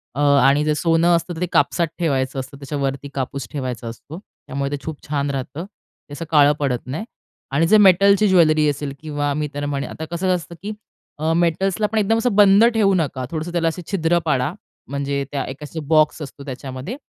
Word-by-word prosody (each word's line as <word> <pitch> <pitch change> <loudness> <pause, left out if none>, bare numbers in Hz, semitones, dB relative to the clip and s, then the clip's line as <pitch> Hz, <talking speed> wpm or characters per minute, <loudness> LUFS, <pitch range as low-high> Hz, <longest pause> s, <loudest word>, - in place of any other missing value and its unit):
अ, - - -4
आणि 140 0 +4
जर 155 - +2
सोनं 170 +1 +3
असतं 170 +1 -2
तर 160 - -7
ते - - +2
कापसात 155 +4 +2
ठेवायचं 135 -5 0
असतं 130 +1 -8
त्याच्यावरती 140 0 -4
कापूस 135 -2 -4
ठेवायचा 130 -4 -4
असतो. 140 +8 -9 0.3
त्यामुळे 140 +1 -3
ते 145 - -2
खूप 160 -2 -5
छान 145 -1 -1
राहतं. 135 +5 -5
ते 200 -7 -19
असं 165 +3 -6
काळं 145 -2 +6
पडत 135 -4 0
नाही 150 +11 -5 0.5
आणि 155 +5 +2
जे 215 - +6
मेटलची 200 +1 +5
ज्वेलरी 155 -5 +4
असेल 145 -1 -3
किंवा 145 -2 -2
मी 150 +1 -2
त्यांना 145 0 -3
म्हणेन 140 -1 -3
आता 160 - -6
कसं 185 +2 +1
असतं 170 -1 -7
की 210 - -4 0.5
अ, 160 +1 0
मेटल्सला 175 +5 +1
आपण 220 +1 -2
एकदम 220 +1 +2
असं 225 -2 0
बंद 205 +1 +6
ठेवू 205 -3 +3
नका. 145 -7 -1
थोडंसं 160 +1 -4
त्याला 170 -1 0
असे 165 +2 -2
छिद्र 175 -3 +2
पाडा 140 -1 0 0.4
म्हणजे 140 0 -2
त्या 140 -2 -2
एक 130 - -7
अशी 150 +2 -6
बॉक्स 155 0 +3
असतो 140 -1 -8
त्याच्यामध्ये. 130 - -6
150 Hz, 200 wpm, -21 LUFS, 140-175 Hz, 0.5 s, काळं